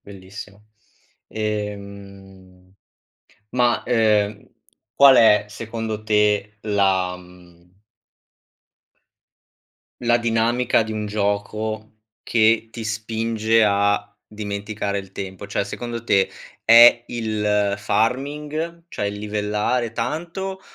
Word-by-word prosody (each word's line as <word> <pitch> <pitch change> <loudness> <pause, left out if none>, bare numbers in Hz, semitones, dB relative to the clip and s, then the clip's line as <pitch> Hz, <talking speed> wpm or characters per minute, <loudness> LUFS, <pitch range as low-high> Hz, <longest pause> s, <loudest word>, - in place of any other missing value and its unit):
bellissimo! 100 +1 -12 0.6
Ehm, 100 -3 -7 0.8
ma, 120 -1 +1
ehm, 105 -3 +1 0.5
qual 140 -2 +7
è 105 -3 +5
secondo 110 0 -5
te 105 0 +1
la, 95 -4 +1
mhmm 90 -1 -18 2.4
la 120 0 +3
dinamica 115 0 +1
di 110 - -5
un 105 -1 -3
gioco 105 +1 -3 0.3
che 115 0 +2
ti 115 0 -7
spinge 110 +1 0
a 100 0 0
dimenticare 100 -1 -4
il 95 -1 -9
tempo. 95 +1 -7
Cioè, 100 - -1
secondo 115 +3 -6
te 100 -4 +2 0.3
è 120 +1 +8
il 105 -3 0
farming? 145 +10 -2
Cioè 105 - -3
il 100 0 -4
livellare 105 +3 -1
tanto? 170 - -4
105 Hz, 95 wpm, -22 LUFS, 100-115 Hz, 2.4 s, è